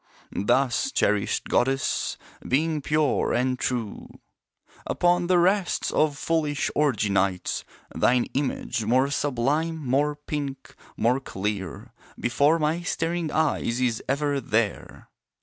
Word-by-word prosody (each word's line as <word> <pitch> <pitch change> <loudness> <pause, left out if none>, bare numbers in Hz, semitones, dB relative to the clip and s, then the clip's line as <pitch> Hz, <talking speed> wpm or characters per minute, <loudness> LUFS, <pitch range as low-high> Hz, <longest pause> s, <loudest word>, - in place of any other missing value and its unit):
Thus, 135 - +1
cherished 105 - +1
goddess, 135 +1 0 0.3
Being 155 +3 +1
pure 150 0 +1
and 125 +1 0
true 120 -5 -3 0.8
Upon 175 0 +2
the 180 0 +4
rests 185 +1 +2
of 150 -2 +1
foolish 150 -2 0
orgy 130 -9 +1
nights 95 -1 0 0.3
Thine 125 0 +3
image, 130 -4 -1
more 130 +5 +2
sublime, 145 +4 0
more 145 +4 +1
pink, 145 -2 -6 0.2
more 125 +3 +2
clear, 100 -6 -5 0.3
Before 140 +7 +3
my 160 +2 0
staring 170 -2 -2
eyes 150 -6 0
is 120 -3 0
ever 140 +1 +1
there. 110 -3 -2
140 Hz, 115 wpm, -25 LUFS, 120-155 Hz, 0.8 s, the